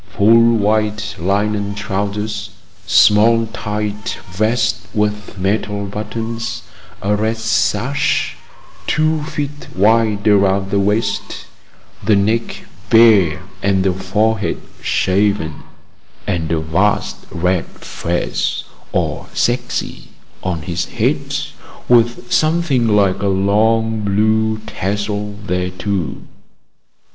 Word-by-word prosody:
Full 115 +3 +5
white 105 0 0
linen 100 +2 0
trousers, 100 +1 -3 0.4
small 115 +2 +5
tight 105 0 -3
vest 110 +3 0
with 105 -1 -1
metal 100 +1 -1
buttons, 115 +3 -4 0.4
a 105 +1 +2
red 110 +2 -1
sash 110 +4 0 0.5
two 155 0 +1
feet 145 -1 -5
wide 105 +1 +2
around 100 -1 +3
the 100 - +2
waist, 105 +3 -1 0.6
the 105 +1 +4
neck 110 +4 0 0.2
bare 105 -9 +5 0.2
and 95 -1 +2
the 95 -1 +2
forehead 105 +3 0 0.2
shaven, 95 -5 0 0.6
and 85 -4 -2
a 80 - +1
vast 85 +7 0
red 90 +1 0
fez, 85 +1 -3 0.3
or - - -2
chechia, 120 +1 -1 0.3
on 85 -4 -3
his 85 0 -2
head, - - -1 0.5
with 120 0 +2
something 155 -6 +2
like 100 -3 +2
a 100 - 0
long 110 +3 +2
blue 110 +2 +1
tassel 105 +1 -3
thereto. 90 -1 -2
105 Hz, 95 wpm, -18 LUFS, 100-110 Hz, 0.6 s, Full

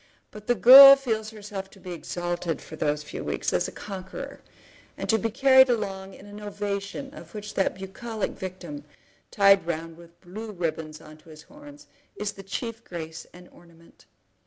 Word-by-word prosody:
But 210 0 -12
the 245 - +3
girl 270 +6 +11
feels 225 -5 -3
herself 205 -3 -8
to 195 - -18
be 180 -1 -9
exalted 175 0 -4
for - - -11
those 150 -1 -1
few - - -7
weeks - - -2
as - - +1
a - - -7
conqueror, 195 +8 -8 0.6
and - - -5
to 225 - +3
be 225 - -1
carried 260 +2 +5
along 195 -4 -3
in - - -14
an 205 0 -11
ovation 205 +5 -5
of 270 - -13
which 210 0 -7
that 195 - 0
bucolic 195 +3 -5
victim, 175 -6 -8 0.5
tied 195 -3 +4
round 165 0 -4
with 170 0 -17
blue 210 +4 -9
ribbons 160 -3 -4
on 155 - -14
to 155 - -20
his 155 -1 -13
horns, 290 0 -15 0.3
is 210 -1 -3
the 195 - -12
chief 225 +4 -6
grace 160 -2 -8
and 180 0 -15
ornament. 170 -1 -21
195 Hz, 180 wpm, -26 LUFS, 170-220 Hz, 0.6 s, girl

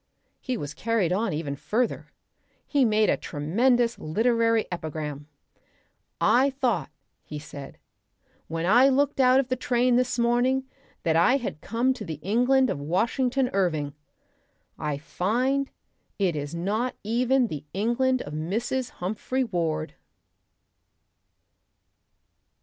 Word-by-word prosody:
He 255 -2 -3
was 145 -6 -5
carried 215 -5 0
on 220 +5 0
even 150 -2 -3
further. 230 - -1 0.6
He 280 -3 +2
made 215 -1 +3
a - - +2
tremendous 230 - +1
literary 230 +6 +2
epigram. 150 -3 -5 0.9
"I 265 +3 +4
thought," 250 - -1 0.3
he 150 - -7
said, 145 -2 -9 0.7
"when 165 +1 -3
I 245 +8 +6
looked 275 +1 +1
out 255 0 +6
of 270 -1 -1
the 255 - +1
train 245 0 +2
this 250 0 0
morning 245 +3 +2 0.4
that 160 -2 +1
I 175 +11 +5
had 215 - -5
come 240 +4 +1
to 250 -4 -8
the 160 -6 -5
England 250 +6 +3
of - - -3
Washington 245 - 0
Irving. 160 -7 0 0.8
I 150 -2 -3
find 250 - 0 0.5
it 185 -5 +1
is 145 +2 -4
not 210 +9 -1
even 250 +4 +2
the 155 -10 -5
England 240 +6 +1
of 145 - -8
Mrs. 230 +11 -2
Humphry 220 +8 -2
Ward." 165 -7 -2
225 Hz, 125 wpm, -26 LUFS, 165-255 Hz, 0.9 s, I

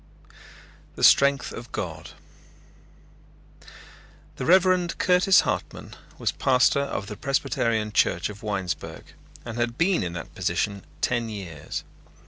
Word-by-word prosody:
THE - - -6
STRENGTH 140 -1 +5
OF 120 +1 -9
GOD - - -5 2.3
The - - -4
Reverend 185 -1 +4
Curtis 180 0 +5
Hartman - - -4 0.2
was - - 0
pastor 130 +1 +3
of 140 -8 -3
the 105 - -7
Presbyterian 115 -5 -1
Church 85 -4 +2
of 105 0 -10
Winesburg, 95 -7 -4 0.3
and 120 0 -6
had 120 0 -1
been 180 +2 +2
in 85 -1 -3
that 85 -2 -7
position 100 -3 -2 0.2
ten 120 -2 0
years. 90 -9 -6
120 Hz, 115 wpm, -25 LUFS, 100-140 Hz, 2.3 s, STRENGTH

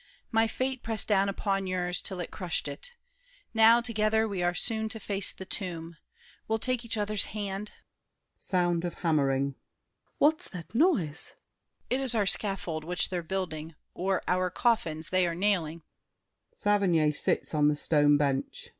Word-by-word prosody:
My 225 0 +3
fate 260 +2 -2
Pressed 225 -2 -2
down 200 -1 +3
upon 195 -1 -1
yours 180 -1 -1
'til 185 -2 0
it 170 - -6
crushed 180 -6 -1
it. 145 - -5 0.6
Now, 225 +1 +6
Together, 220 -1 +1
we 195 -4 -3
are 175 0 +1
soon 220 +1 0
to 220 - -1
face 200 -1 +3
the 190 - -9
tomb. 170 -3 -3 0.5
We'll 220 - +1
take 250 +1 +1
each 230 -1 0
other's 210 0 +2
hand— 205 0 -4 0.6
[Sound 175 -2 0
of 175 - -4
hammering. 140 -3 +2
SAVERNY. - - -45
What 310 +2 +4
is - - -11
that 175 0 -9
noise? 230 - +1 0.6
DIDIER. 255 +2 0
It - - -1
is 250 -3 +1
our 210 -2 +2
scaffold 190 -6 -1
which 180 +2 -1
they're 180 -2 -2
building, 165 -3 -4 0.2
or 190 +1 -1
Our 185 0 +1
coffins 170 -7 0
they 185 -1 +3
are 170 - -2
nailing. 170 -4 0
195 Hz, 145 wpm, -28 LUFS, 175-220 Hz, 0.6 s, Now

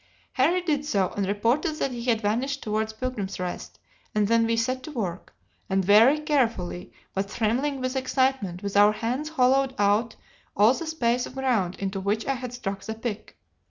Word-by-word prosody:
Harry 335 +7 +2
did 295 -4 0
so, 200 -11 +1
and 200 -2 -1
reported 235 +10 +1
that 275 - -1
he 240 -1 -6
had 230 -3 +2
vanished 255 +7 -1
towards 215 0 -1
Pilgrim's 220 -5 -4
Rest, 180 -1 -5 0.4
and 210 -1 +2
then 230 +1 +3
we 230 0 +1
set 255 +3 0
to 310 - -8
work, 190 -9 -5 0.3
and 190 -1 +1
very 225 +9 +6
carefully, 230 - -1 0.2
but 195 +1 -2
trembling 250 +6 0
with 255 +1 -2
excitement, 260 -8 0
with 200 0 -4
our 205 +1 +6
hands 245 +7 -2
hollowed 265 -2 +2
out 205 +3 +2 0.4
all 210 +5 +6
the 330 +4 -5
space 245 -6 0
of - - -13
ground 235 -9 0
into 195 0 -3
which 205 +3 -1
I 275 - +1
had 250 -2 -6
struck 195 -5 -5
the 220 - -5
pick. 220 -2 -6
230 Hz, 185 wpm, -26 LUFS, 205-265 Hz, 0.4 s, very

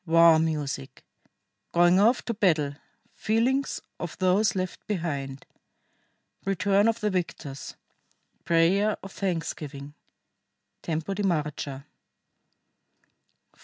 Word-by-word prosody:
WAR 165 -1 +7
MUSIC. 150 - -3 0.7
GOING 175 +2 +5
OFF 230 +5 +3
TO 235 - -1
BATTLE. 160 -9 +2 0.4
FEELINGS 250 +5 0 0.2
OF 175 -2 -6
THOSE 190 +3 +2
LEFT 185 -1 -4
BEHIND. 140 -8 -3 1.0
RETURN 195 +2 +2
OF 230 0 +1
THE 210 -1 +1
VICTORS. 165 -6 -4 0.7
PRAYER 185 +6 +3
OF 195 - -8
THANKSGIVING 150 -7 -4 0.9
(Tempo 160 +3 -2
di 200 - -3
marcia) 150 -6 -2 1.7
4. - - -30
175 Hz, 95 wpm, -27 LUFS, 155-200 Hz, 1.7 s, WAR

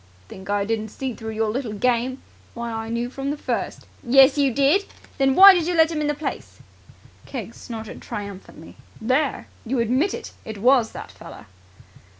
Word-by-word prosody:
"Think 190 +1 -11
I 205 -1 +1
didn't 220 0 -2
see 260 +4 -5
through 220 0 -7
your 220 0 0
little 240 -2 -3
game? 250 +4 0 0.3
Why, 235 0 -4
I 225 0 -5
knew 235 +1 -2
from 270 +2 -5
the 295 - -2
first." - - -4 0.2
"Yes, 270 +2 +6
you 280 -2 +2
did! 285 - +3 0.3
Then 270 -1 +3
why 390 +1 +10
did 345 -3 0
you 355 - 0
let 320 0 +4
him 310 -2 -2
into 295 0 0
the - - -22
place?" 315 - -5 0.7
Keggs 235 -4 -7
snorted 225 -2 -8
triumphantly. 200 -7 -9 0.2
"There! 260 +5 0 0.2
You 255 +3 -2
admit 255 - +1
it! - - -8
It 220 -1 -7
was 240 +1 +3
that - - -8
feller!" - - -12
245 Hz, 180 wpm, -23 LUFS, 220-275 Hz, 0.7 s, why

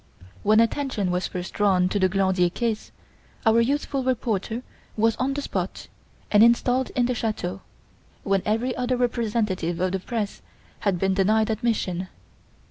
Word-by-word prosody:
When 215 +1 +4
attention 230 -5 +1
was 180 0 0
first 180 0 -6
drawn 190 -3 +3
to 205 - 0
the 185 -1 +3
Glandier 190 -2 +2
case, 225 +3 -3 0.5
our 225 +1 +5
youthful 275 +2 0
reporter 235 -2 -1 0.3
was 225 +1 +3
on 270 +2 0
the 285 - -3
spot - - -4 0.4
and 205 - +6
installed 245 +2 +4
in 245 - +3
the 250 - 0
chateau, 195 -5 -3 0.6
when 195 -1 +1
every 230 +4 0
other 250 0 0
representative 215 -8 -1
of 185 0 +1
the 190 - -1
press 210 +1 -4 0.4
had 200 -3 0
been 190 +2 +1
denied 215 +3 +2
admission. 215 -5 -1
215 Hz, 150 wpm, -24 LUFS, 190-240 Hz, 0.6 s, and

